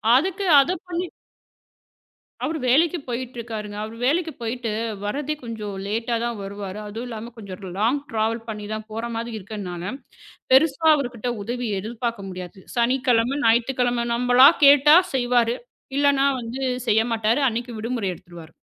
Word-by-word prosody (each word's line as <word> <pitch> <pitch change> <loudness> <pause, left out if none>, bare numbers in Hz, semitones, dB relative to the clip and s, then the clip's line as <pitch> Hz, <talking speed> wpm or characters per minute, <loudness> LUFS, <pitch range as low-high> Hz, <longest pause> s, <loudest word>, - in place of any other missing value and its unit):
அதுக்கு 380 +7 +1
அத 275 +6 +3 0.2
பண்ணி. 355 +1 -2 1.4
அவரு 320 +1 -1
வேலைக்கு 325 +7 +4
போயிட்டுருக்காருங்க. 235 -4 -5
அவரு 220 +1 -7
வேலைக்கு 320 +3 +1
போயிட்டு 230 -1 -3 0.3
வர்றதே 290 +7 -2
கொஞ்சம் 215 -4 -5
லேட்டா 225 +3 -1
தான் 235 -2 -2
வருவாரு. 200 0 -6
அதுவும் 225 +4 -6
இல்லாம 230 +1 -7
கொஞ்சம் 200 -2 -9
லாங் 235 +7 +2
ட்ராவல் 225 +1 -1
பண்ணித்தான் 215 0 -5
போற 225 +2 -4
மாரி 230 +1 -4
இருக்கனால, 190 -1 -6 0.6
பெருசா 305 +2 +4
அவர்கிட்ட 245 -4 -3
உதவி 245 +2 -3
எதிர்பார்க்க 225 -1 -4
முடியாது. 185 0 -8
சனிக்கிழமை, 250 +1 +2
ஞாயிற்றுக்கிழமை 240 +1 +2
நம்மளா 245 +2 +7 0.2
கேட்டா 290 +2 +8 0.2
செய்வாரு. 245 -1 +2 0.4
இல்லனா 280 -1 +3 0.2
வந்து 240 +3 -6 0.3
செய்யமாட்டாரு. 225 +2 +2
அன்னைக்கு 235 +2 -4
விடுமுறை 230 -3 -2
எடுத்துருவாரு. 170 -3 -13
235 Hz, 125 wpm, -23 LUFS, 215-255 Hz, 1.4 s, கேட்டா